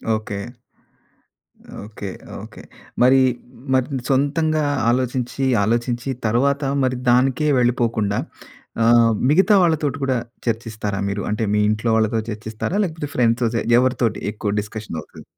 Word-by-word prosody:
Okay. 110 -2 -5 1.5
Okay. 105 -2 -7 0.3
Okay. - - -11 0.4
మరీ 130 +2 +6 0.5
మరి 130 -1 +3 0.2
సొంతంగా 155 +3 +1 0.3
ఆలోచించి, 125 +1 -1 0.2
ఆలోచించి 120 +4 -1 0.2
తర్వాత 140 +6 +1 0.2
మరి 130 -1 0
దానికే 130 +4 +3
వెళ్ళిపోకుండా 115 -4 +1 0.6
ఆహ్, 115 0 +5 0.2
మిగతా 190 +7 +5
వాళ్ళతోటి 155 -5 +1
కూడా 130 -1 +1 0.3
చర్చిస్తారా 110 -3 -3
మీరు? 100 +1 -3
అంటే 105 +2 -1
మీ 105 - +2
ఇంట్లో 110 +2 -1
వాళ్ళతో 110 0 +1
చర్చిస్తారా? 110 - -4
లేకపోతే 160 -5 -4
ఫ్రెండ్స్‌తోటి 115 -1 +1 0.2
ఎవరితోటి 125 -2 0
ఎక్కువ 105 -1 -3
డిస్కషన్ 105 -2 -8
అవుతది? - - -14
120 Hz, 115 wpm, -21 LUFS, 110-135 Hz, 1.5 s, మరీ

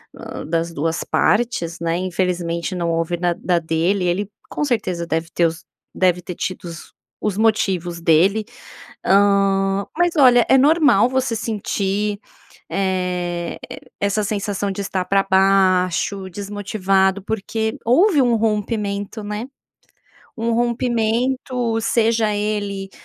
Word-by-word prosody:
ah, - - -8
das 165 +1 -1
duas 165 +2 -2
partes, 210 -7 0
né, 165 0 0
infelizmente, 180 -1 -2
não 170 -1 -1
houve 165 +1 -1
na 175 0 +1
da 175 0 0
dele. 170 +4 0
Ele 190 +3 -1 0.2
com - - -3
certeza 205 -11 -1
deve 165 0 -2
ter 170 - +3
os 165 0 -7 0.3
deve 180 -1 +2
ter 180 0 -7
tido 185 - -4
os 165 -2 -9 0.3
os 205 -2 -1
motivos 190 -6 +1
dele. 180 +6 +3 0.6
Hã, 195 0 +3
mas 350 0 +3
olha, 245 -4 +6
é 265 - +6
normal 295 -1 +5
você 260 -1 -1
sentir, 210 -2 -2 0.5
eh, 180 -2 -2 0.4
essa 200 +1 +1
sensação 205 -1 -2
de 195 +1 -4
estar 190 -2 -2
pra 195 +1 +2
baixo, 190 0 +2
desmotivado, 195 0 0
porque 220 +1 -2
houve 300 - +4
um 240 -2 +3
rompimento, 210 -1 -2
né? 210 +2 -4 0.9
Um 230 0 -1
rompimento, 240 0 0
seja 225 -1 +1
ele, 205 -2 -3
200 Hz, 125 wpm, -20 LUFS, 180-220 Hz, 0.9 s, olha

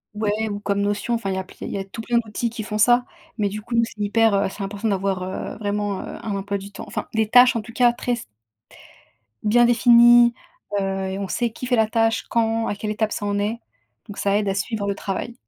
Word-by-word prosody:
Ouais 215 +1 -1
ou 205 0 -4
comme 200 -1 -1
Notion, 205 +3 -1
enfin, 230 -4 -2
il 190 - -1
y - - -3
a 190 - -2
pl 185 - -17
il - - -5
y - - -3
a 195 - -3
tout 195 +4 -8
plein 235 +1 0
d'outils 235 +1 -1
qui 225 -1 -6
font 210 0 -4
ça, 240 +3 +5 0.3
mais 210 -2 +1
du 210 +2 -5
coup, 235 +2 -5
c'est 225 -2 -7
hyper, 220 +1 +3
heu 200 -1 +1
c'est 200 - -7
important 200 +3 -3
d'avoir, 195 -2 0
heu, 185 +1 -5
vraiment, 205 -1 -2
heu, - - -7
un 210 -2 -3
emploi 200 +1 -2
du 200 +1 -10
temps. - - -8
Enfin, - - -5
des 220 -1 +1
tâches 250 +2 +7
en 230 - 0
tout 230 +2 -12
cas 245 0 +4
très 245 +1 -2
s 235 - -4 1.2
bien 235 +3 +4
définies, 240 0 +6 0.5
heu, - - -1 0.3
et 190 - -4
on 195 -2 -4
sait 240 -1 0
qui 240 - -7
fait 250 -1 +1
la 220 -1 +3
tâche, 225 0 +1
quand, 225 -1 +1
à - - -2
quelle 210 +1 -4
étape 215 0 -1
ça 205 - -4
en 205 0 0
est, 215 +3 -2 0.5
donc 205 - -9
ça 200 0 +1
aide 205 -1 0
à - - +1
suivre 205 +1 -2
le 200 0 -1
travail. 200 +4 -4
215 Hz, 255 wpm, -22 LUFS, 200-235 Hz, 1.2 s, tâches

